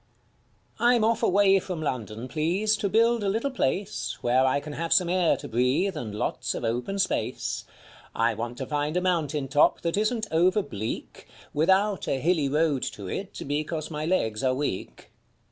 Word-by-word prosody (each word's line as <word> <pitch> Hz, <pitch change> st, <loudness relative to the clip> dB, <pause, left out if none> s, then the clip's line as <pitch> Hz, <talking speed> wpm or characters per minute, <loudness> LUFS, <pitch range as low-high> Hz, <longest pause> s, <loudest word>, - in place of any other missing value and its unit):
I'M 240 Hz, -1 st, +4 dB
off 225 Hz, 0 st, +2 dB
away 195 Hz, 0 st, +4 dB
from 180 Hz, -2 st, -5 dB
London, 120 Hz, -5 st, -4 dB
please, 175 Hz, -, +1 dB
to 200 Hz, -, -1 dB
build 230 Hz, +2 st, +3 dB
a 200 Hz, -, +1 dB
little 230 Hz, +8 st, -1 dB
place 185 Hz, -, -2 dB
I -, -, -29 dB
Where 125 Hz, +2 st, +3 dB
I 130 Hz, +2 st, +2 dB
can 145 Hz, +1 st, -8 dB
have 165 Hz, +2 st, -4 dB
some 180 Hz, -2 st, +4 dB
air 180 Hz, -2 st, +2 dB
to -, -, -8 dB
breathe 125 Hz, -, +1 dB
and 110 Hz, -8 st, -5 dB
lots -, -, -2 dB
of -, -, -5 dB
open 125 Hz, +13 st, -2 dB
space; 195 Hz, -, -1 dB, 0.5 s
I 115 Hz, 0 st, +2 dB
want 120 Hz, +2 st, -5 dB
to 130 Hz, -, -4 dB
find 150 Hz, +4 st, -1 dB
a -, -, +1 dB
mountain 160 Hz, -6 st, 0 dB
top 145 Hz, +3 st, +3 dB
that 170 Hz, +2 st, -1 dB
isn't 215 Hz, +1 st, 0 dB
over 180 Hz, +5 st, +3 dB
bleak. 105 Hz, -, -6 dB, 0.3 s
Without 190 Hz, +6 st, +2 dB
a 135 Hz, -, 0 dB
hilly 155 Hz, -1 st, +1 dB
road 150 Hz, -2 st, +1 dB
to 100 Hz, -2 st, -8 dB
it, 195 Hz, -, -5 dB
because 155 Hz, +2 st, -3 dB
my 155 Hz, 0 st, -3 dB
legs 110 Hz, -12 st, 0 dB
are 130 Hz, -1 st, +2 dB
weak. 135 Hz, -9 st, -4 dB
160 Hz, 180 wpm, -26 LUFS, 130-195 Hz, 0.5 s, I'M